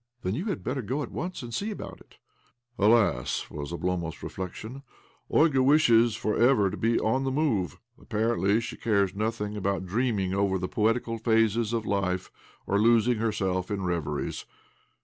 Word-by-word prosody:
' 120 - -48
Then 90 - -1
you 160 - -3
had 200 -8 -3
better 130 +1 -2
go 130 +7 -2
at 120 - -8
once 180 -5 -5
and 120 -1 -8
see 205 - -2
about 210 - -7
it." - - -21 0.3
' 120 0 -45
Alas!" 105 - +2
was 75 +1 -6
Oblomov's 85 -1 -3
reflection. 110 +8 -6 0.2
" - - -35
Olga 150 -4 +4
wishes 120 -5 +5
for 110 -1 -1
ever 115 -6 +4
to - - -4
be 115 +1 +1
on 130 +5 +1
the 135 - 0
move. 130 - 0 0.2
Apparently 110 -2 +1
she - - -6
cares 100 -4 +1
nothing 105 0 -2
about 100 -2 -1
dreaming 100 -2 0
over 100 -1 +1
the 90 0 -3
poetical 115 +2 0
phases 115 -1 +2
of 115 -2 -1
life, 95 -2 -1 0.3
or 100 - +1
losing 115 +1 +4
herself 95 -4 -1
in 100 -2 -2
reveries. 80 -5 -3
110 Hz, 175 wpm, -27 LUFS, 95-120 Hz, 0.3 s, wishes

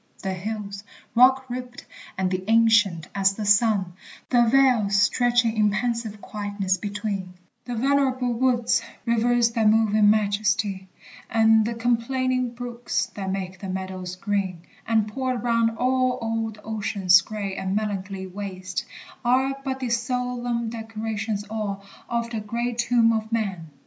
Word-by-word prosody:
The 190 -1 -1
hills, 200 +1 -5 0.3
Rock 260 +2 +5
ribbed, 250 0 -7 0.3
and 185 0 0
ancient 220 -7 +4
as 195 0 +2
the 215 - -4
sun; 205 -3 +3 0.4
the 245 -2 +5
vales 245 -6 +4
Stretching 240 +1 +2
in 210 -1 +3
pensive 230 0 -2
quietness 205 -2 -2
between; 200 -3 -4 0.3
The 245 - -4
venerable 260 0 +1
woods; 240 -1 +2 0.2
rivers 235 0 +2
that 225 -2 +3
move 220 -1 +3
In 210 -1 +5
majesty, 205 -2 +1 0.4
and 220 -1 +4
the 235 +1 -2
complaining 245 +1 0
brooks, 240 0 -3
That 195 -2 -4
make 190 -1 -4
the 195 - -6
meadows 185 -1 -5
green; 190 -3 -2 0.2
and, 220 -2 +2
poured 255 0 -2
round 230 -1 +1
all, 255 0 +1
Old 225 -1 -3
ocean's 200 -4 +3
gray 205 -3 -5
and 190 0 -2
melancholy 200 -2 -3
waste, 185 +1 -5 0.4
Are 260 +2 +2
but 265 -1 -3
the 250 - -2
solemn 245 -1 -1
decorations 220 -2 -4
all 205 -2 -4 0.2
Of 235 0 -2
the 225 - -2
great 235 +3 -3
tomb 235 -1 +3
of 220 0 -3
man! 195 -8 -2
220 Hz, 140 wpm, -24 LUFS, 200-240 Hz, 0.4 s, Rock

